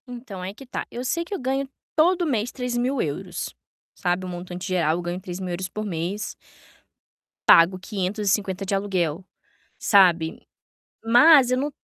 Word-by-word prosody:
Então, 240 -6 -8
aí 185 +2 -5
que 270 +6 -13
tá, 245 - -5
eu 245 - -5
sei 335 +6 0
que 345 - -8
eu - - -2
ganho 270 +1 -1 0.3
todo 350 +3 +3
mês 245 -6 -1
€3.000, 245 - -3 0.4
sabe, 180 +1 -1
o - - -5
montante 180 +1 -6
geral 170 -4 +1
eu - - -3
ganho 175 +1 -4
€3.000 180 0 -5
por 215 +4 -5
mês 185 +3 -3 1.1
pago 180 +3 +7
550 195 0 -1
de 195 - 0
aluguel, 185 -4 -1 0.5
sabe? 175 -5 +3 0.6
Mas 250 +3 +6
eu 255 - +2
não 285 +3 -1
195 Hz, 145 wpm, -24 LUFS, 180-250 Hz, 1.1 s, pago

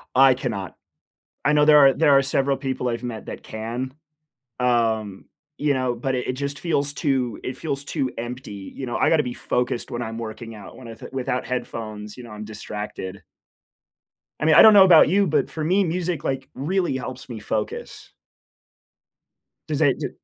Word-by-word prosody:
I 135 0 +7
cannot. 100 -7 -4 0.7
I 150 - +4
know 150 0 +5
there 150 -1 +7
are 135 - +4
there 160 -2 +3
are - - +5
several 135 0 +1
people 130 -2 -3
I've 115 0 -2
met 115 -3 -5
that - - -8
can, 120 +4 -5 0.7
um, 115 -5 0 0.3
you 145 -1 +1
know, 130 -2 -1
but 130 +3 -2
it 125 - -3
it - - 0
just 140 +2 -4
feels 145 -3 0
too 130 -7 -1
it 130 0 -5
feels 140 -2 -3
too 140 -3 -2
empty, 115 -4 -7
you 135 - -5
know? 120 - -3
I - - +3
gotta 160 -2 +3
be 125 - -4
focused 125 0 -2
when 120 - -3
I'm 115 -1 -5
working 115 0 -7
out. 105 - -11
When 130 - -11
I 115 - -7
th 110 - -11
without 130 -1 -2
headphones, 110 -4 -5
you 125 - -9
know, 115 - -11
I'm 105 0 -7
distracted. 105 -2 -7 1.2
I 150 - -1
mean, 155 -1 +5
I - - +10
don't 220 - +9
know 200 -2 +9
about 175 -5 +7
you, 200 +3 +3
but 150 -4 +1
for 155 - -5
me, 185 +6 +3
music, 175 -2 -2
like, 135 0 -3
really 170 +2 0
helps 130 0 -7
me 115 -3 -6
focus. 105 0 -5 1.6
Does - - -1
it - - +3
do - - -3
130 Hz, 195 wpm, -23 LUFS, 115-145 Hz, 1.6 s, I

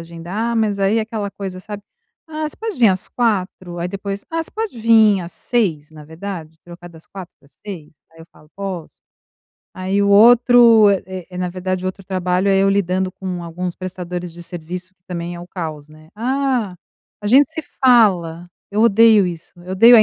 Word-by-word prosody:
agendar, 175 +8 -4
mas 210 -3 0
aí 200 +3 +2
é - - +2
aquela 215 -2 -4
coisa, 190 -2 -7
sabe: 205 0 -8 0.5
"Ah, 310 0 -3
você - - -11
pode 440 - -5
vim 230 -4 +6
às 185 -1 -1
4h?", 190 -6 -2
aí 175 +1 -2
depois: 200 +1 -5
"Ah, 330 0 -1
você - - -9
pode 435 - -4
vim 220 -3 +5
às 170 - -9
6h, 165 -11 -1
na 155 -1 -13
verdade. 160 -1 -8
Trocar 175 0 -11
das 160 -1 -16
4h 190 -3 -10
para - - -25
as 140 - -24
6h?". 180 -8 -8 0.2
Aí 165 - -20
eu 165 - -13
falo: 150 - -21
"Posso". 190 -5 -6 0.7
Aí 190 +2 -1
o 200 - +2
outro 230 0 +7
eh 185 -2 -3
eh, 180 - -8
na 180 -1 -1
verdade 185 +1 -3
o - - -1
outro 185 +1 -5
trabalho 185 +1 0
é 195 - +4
eu 195 - +3
lidando 190 -1 0
com 180 -2 -5
alguns 175 +1 -5
prestadores 180 -1 -6
de 175 - -10
serviço, 180 +2 -7
que 180 - -53
também 175 -1 -5
é 175 - -8
o 175 - -11
caos, 155 -5 -6
né: 155 0 -17
"Ah, 250 -5 -1 0.5
a 205 - -4
gente 275 +7 +5
se 320 - -4 0.2
fala", 175 -9 +3 0.2
eu 210 +2 +1
odeio 220 -2 +6
isso, 170 -2 -7
eu 185 - -7
odeio 230 +5 +8
a 215 - +8
190 Hz, 205 wpm, -19 LUFS, 175-215 Hz, 0.7 s, odeio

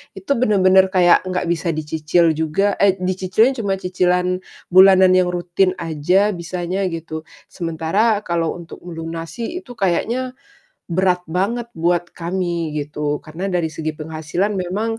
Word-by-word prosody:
itu 195 +7 -6
benar-benar 190 -5 +4
kayak 180 -1 +5
nggak 180 -1 -2
bisa 170 0 0
dicicil 155 +2 +1
juga 160 +6 0
eh, 195 -1 +4
dicicilnya 190 +7 +1
cuma 195 -1 0
cicilan 180 0 0 0.3
bulanan 190 0 +7
yang 185 -1 +3
rutin 180 +1 +1
aja 175 +6 +1
bisanya, 175 +2 -3
gitu. 160 -1 -6 0.3
Sementara 175 +6 0
kalau 170 -1 -1
untuk 170 -1 -10
melunasi 165 - -6
itu 260 -9 -14
kayaknya 235 +6 -1 0.6
berat 180 0 +2
banget 230 +7 -1
buat 175 +1 0
kami 170 -2 -3
gitu, 150 0 -2
karena 165 +5 -5
dari 175 -4 -1
segi 155 -1 -4
penghasilan 160 +6 -2
memang, 205 +5 -2
180 Hz, 130 wpm, -20 LUFS, 165-195 Hz, 0.6 s, bulanan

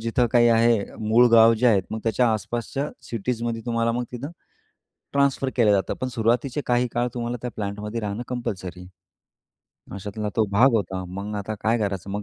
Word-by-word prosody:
जिथं 115 +2 +1
काही 120 -1 +5
आहे, 115 0 +4 0.3
मूळ 120 +3 +6
गाव 115 0 +7
जे 125 - +3
आहेत 105 -5 +4
मग 110 - -3
त्याच्या 115 +2 +2
आसपासच्या 120 +6 -3
सिटीजमध्ये 115 +1 -3
तुम्हाला 115 -1 +1
मग 125 +1 -2
तिथं 130 +5 -6 0.8
ट्रांसफर 140 -1 +1
केलं 110 -4 +4
जातं. 100 -1 +1
पण 130 - -1
सुरुवातीचे 125 +4 0
काही 125 0 +2
काळ 120 +1 0
तुम्हाला 120 0 -3
त्या 125 - -3
प्लांटमध्ये 105 +2 -4
राहणं 105 +2 -3
कंपल्सरी. 95 -8 -5 1.1
अशातला 105 +2 -5
तो 110 - +4
भाग 120 +7 +5
होता. 95 -3 -1
मग 100 +3 -6
आता 100 +2 -4
काय 115 +2 +1
करायचं 100 -3 -3
मग 105 +1 -3
115 Hz, 170 wpm, -24 LUFS, 105-120 Hz, 1.1 s, गाव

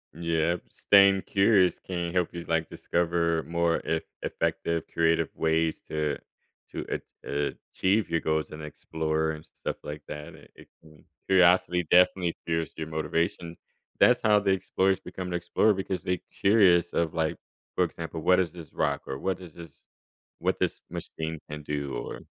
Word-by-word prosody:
Yep, 85 +1 0
staying 100 -1 +5
curious 95 -2 +3
can 85 -2 -4
help 90 -2 +1
you, 85 -1 -6
like, 80 -1 +1
discover 85 -1 0
more 85 0 +1
eff 80 -1 -1 0.2
effective, 85 -1 -1
creative 80 -1 +2
ways 80 0 +1
to 75 -1 -1 0.5
to - - -5
ach - - -3 0.7
achieve 100 +3 +1
your 80 - +2
goals 80 -1 -1
and 75 0 -8
explore, 80 +1 -2
and 75 -1 -8
stuff - - -4
like 75 0 -7
that, 75 0 -7
it - - -17
it - - -15
can 75 -1 -19 0.2
curiosity 90 -2 +4
definitely 90 -1 +4
fuels 80 -2 -1
your 80 -1 -4
motivation. 80 +2 -2 0.4
That's 125 0 +5
how 105 -2 +5
the 100 -1 +1
explorers 95 0 +1
become 90 0 -7
the 90 - -1
explorer, 90 +5 +2
because 95 -1 -3
they 90 -1 -1 0.2
curious 95 -4 +5
of 85 -2 0
like, 80 -1 0 0.4
for - - +3
example, 80 -1 -6
"What 90 +2 +4
is 90 -3 0
this 85 -2 -11
rock," - - 0
or, 65 - -4
"What 95 +6 -2
is 90 -4 -11
this 85 -4 -13 0.5
what - - 0
this - - 0
machine 80 0 -5
can 75 0 -6
do," 70 -2 -3
or - - -5
85 Hz, 165 wpm, -27 LUFS, 80-90 Hz, 0.7 s, staying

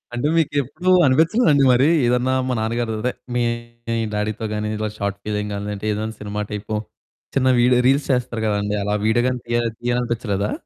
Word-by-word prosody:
అంటే 120 +4 0
మీకెప్పుడు 145 +3 0 0.2
అనిపిచ్చలేదండి? 155 - +4
మరి, 130 +4 +4 0.2
ఏదన్నా 125 +2 +2
మా 130 - 0
నాన్నగారు 115 +1 -1
అదే 125 - 0 0.2
మీ 120 - +2 0.7
డ్యాడీ‌తో 105 +1 -2
గాని, 105 0 -2
ఇలా 110 0 -2
షార్ట్‌ఫిల్మ్ 105 +1 -3
గాని 100 +1 -4
అంటే 100 +2 -7
ఏదైనా 110 +1 -3
సినిమా 105 0 -4
టైపో 105 +1 -3 0.6
చిన్న 130 -1 +3
వీడియో 125 +1 +4
రీల్స్ 140 +2 +2
చేస్తారు 125 -3 -1
కదండీ! 105 0 0
అలా 105 +1 0
వీడియో 120 +2 +3
గాని 125 -1 -1
తీయ 120 0 0 0.2
తీయాలనిపిచ్చలేదా? 120 -4 -1
120 Hz, 160 wpm, -21 LUFS, 105-125 Hz, 0.7 s, అనిపిచ్చలేదండి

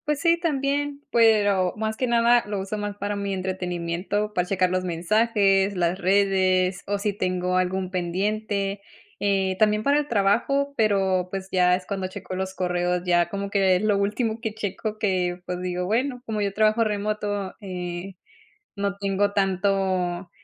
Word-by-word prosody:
Pues 300 -1 0
sí, 335 +2 +3
también, 285 -2 -1
pero 205 -5 +4
más 220 0 -2
que 255 - -1
nada 235 0 +4
lo 205 -1 -3
uso 195 +2 -4
más 205 0 -4
para 205 0 -3
mi 200 -1 -3
entretenimiento, 185 +2 -2
para 180 -2 0
checar 185 -2 +1
los 185 0 0
mensajes, 195 +2 +2
las 175 +1 0
redes 190 -1 +2
o 205 0 0
si 200 +1 -1
tengo 180 -1 -1
algún 185 0 -1
pendiente. 200 +2 -2 0.4
Eh, 195 -2 +1
también 210 0 +3
para 285 +3 +3
el 295 - -3
trabajo, 240 +6 +1
pero, 195 -5 +2
pues, 190 0 -5
ya 180 -1 +4
es 185 0 -6
cuando 190 -1 -3
checo 185 0 -7
los 190 0 -4
correos, 180 0 0
ya 175 -1 +3
como 200 +1 -4
lo 195 +1 +3
último 220 +3 -1
que 220 -3 -4
checo, 215 +1 -4
que, 185 -4 0
pues 180 0 -4
digo, 180 0 -2
bueno, 245 +5 -1
como 215 -2 -2
yo 200 -1 0
trabajo 215 +2 +3
remoto, 205 -2 -2
eh, 180 -1 -6 0.6
no 200 0 -2
tengo 200 0 0
tanto, 190 -2 0
195 Hz, 160 wpm, -24 LUFS, 185-215 Hz, 0.6 s, pero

